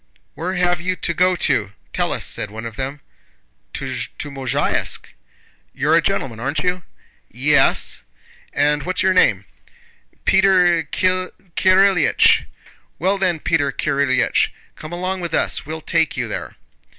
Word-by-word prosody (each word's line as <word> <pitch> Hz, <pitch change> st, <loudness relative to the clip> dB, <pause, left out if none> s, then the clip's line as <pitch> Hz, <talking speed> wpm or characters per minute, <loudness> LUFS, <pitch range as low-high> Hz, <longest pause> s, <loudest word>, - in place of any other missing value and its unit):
"Where 185 Hz, +3 st, -4 dB
have 175 Hz, -1 st, +1 dB
you 185 Hz, +1 st, -1 dB
to 170 Hz, -, -2 dB
go 180 Hz, +2 st, +3 dB
to? 100 Hz, -, 0 dB, 0.2 s
Tell -, -, 0 dB
us!" -, -, -2 dB
said 105 Hz, -, -2 dB
one 110 Hz, +2 st, -8 dB
of 115 Hz, -1 st, -7 dB
them. 135 Hz, +2 st, -5 dB, 0.7 s
"To -, -, -5 dB, 0.5 s
Mozháysk." 135 Hz, -3 st, -1 dB, 0.7 s
"You're -, -, +1 dB
a -, -, +5 dB
gentleman, 115 Hz, -5 st, -2 dB
aren't 140 Hz, +5 st, -2 dB
you?" 180 Hz, 0 st, 0 dB, 0.5 s
"Yes." -, -, +2 dB, 0.5 s
"And 150 Hz, +1 st, +1 dB
what's 185 Hz, +5 st, -1 dB
your 190 Hz, 0 st, +3 dB
name?" 105 Hz, -, +3 dB, 0.8 s
"Peter 180 Hz, -3 st, +4 dB
Kirílych." 185 Hz, -1 st, +2 dB, 0.5 s
"Well 190 Hz, +5 st, 0 dB
then, 180 Hz, -4 st, +1 dB
Peter 145 Hz, -5 st, +1 dB
Kirílych, 140 Hz, -1 st, +1 dB, 0.3 s
come 155 Hz, -, -9 dB
along 185 Hz, +2 st, -3 dB
with 170 Hz, -, -2 dB
us, -, -, -1 dB
we'll 160 Hz, +1 st, -5 dB
take 160 Hz, 0 st, 0 dB
you -, -, -1 dB
there." -, -, -6 dB
170 Hz, 135 wpm, -20 LUFS, 140-185 Hz, 0.8 s, a